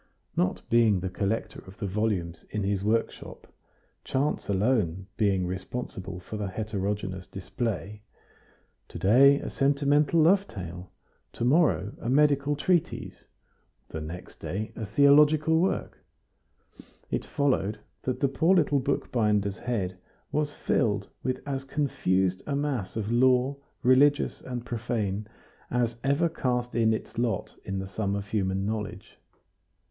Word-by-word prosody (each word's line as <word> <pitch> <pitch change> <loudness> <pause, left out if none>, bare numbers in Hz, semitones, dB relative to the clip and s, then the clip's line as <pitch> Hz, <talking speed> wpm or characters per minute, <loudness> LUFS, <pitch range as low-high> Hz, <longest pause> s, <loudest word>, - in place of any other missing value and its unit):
Not 90 - 0
being 115 -4 +4
the 90 +1 -4
collector 105 +3 -2
of 95 +2 -12
the - - -4
volumes 95 -4 -1
in 105 -1 -2
his 100 0 0
workshop, 110 +2 -2 0.6
chance 140 -2 -1
alone 100 -3 +1
being 100 -5 +2
responsible 95 0 -5
for 100 +4 -7
the 105 -1 -2
heterogeneous 100 -2 -3
display, 105 - -4 0.9
to - - -9
day 135 +8 +6
a - - -5
sentimental 145 +3 +2
love 190 +5 +4
tale, 90 -3 -8 0.4
to 115 - -2
morrow 130 - +3
a 115 - -3
medical 145 +1 +3
treatise, 175 +3 -1 0.6
the 80 - -5
next 85 +4 -8
day 105 +4 -4
a 110 - -5
theological 150 +6 +5
work, 190 - -1 1.1
it - - -1
followed 130 -8 0 0.2
that 130 - -3
the 140 - +4
poor 160 +7 +3
little 150 -5 +3
bookbinder's 105 -7 0
head 95 -7 -2 0.3
was 150 -1 0
filled 105 -8 0
with 130 - -2
as 135 -1 -2
confused 95 -10 0
a 140 - -1
mass 140 -9 -2
of 110 0 -2
lore, 130 +2 +3 0.3
religious 140 +3 +4
and 125 -2 -6
profane, 110 -4 -2 0.4
as 120 -1 0
ever 140 +5 +2
cast 125 -6 -2
in 115 -1 +3
its 110 +1 -3
lot 115 -5 -1
in 95 0 -4
the 95 0 -4
sum 100 +1 -2
of 100 0 -3
human 95 -2 0
knowledge. 105 -2 -5
110 Hz, 135 wpm, -27 LUFS, 95-140 Hz, 1.1 s, day